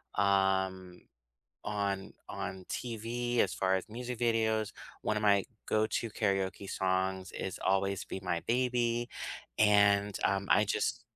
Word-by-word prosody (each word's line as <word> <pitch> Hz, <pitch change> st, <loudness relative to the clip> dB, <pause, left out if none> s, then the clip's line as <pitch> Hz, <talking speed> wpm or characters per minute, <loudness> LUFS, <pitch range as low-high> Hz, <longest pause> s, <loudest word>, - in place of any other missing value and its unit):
um, 95 Hz, -2 st, +1 dB, 0.6 s
on 100 Hz, -2 st, -2 dB, 0.2 s
on 95 Hz, -1 st, -5 dB
TV 120 Hz, +1 st, -2 dB
as 95 Hz, -, +3 dB
far 95 Hz, 0 st, +2 dB
as 95 Hz, +2 st, -3 dB
music 125 Hz, +1 st, -5 dB
videos. 110 Hz, -2 st, +1 dB, 0.3 s
One 105 Hz, -, 0 dB
of 105 Hz, -, -2 dB
my 100 Hz, -2 st, +5 dB, 0.2 s
go 110 Hz, 0 st, +2 dB
to 115 Hz, +1 st, -2 dB
karaoke 100 Hz, -2 st, -1 dB
songs 95 Hz, 0 st, 0 dB
is 95 Hz, -, -4 dB
Always 95 Hz, 0 st, +1 dB
Be -, -, -5 dB
My 85 Hz, -2 st, -1 dB
Baby, 120 Hz, -1 st, +1 dB, 0.5 s
and, 100 Hz, -1 st, +4 dB
um, 100 Hz, 0 st, +1 dB
I 105 Hz, -, +6 dB
just -, -, -1 dB
100 Hz, 135 wpm, -32 LUFS, 95-115 Hz, 0.6 s, I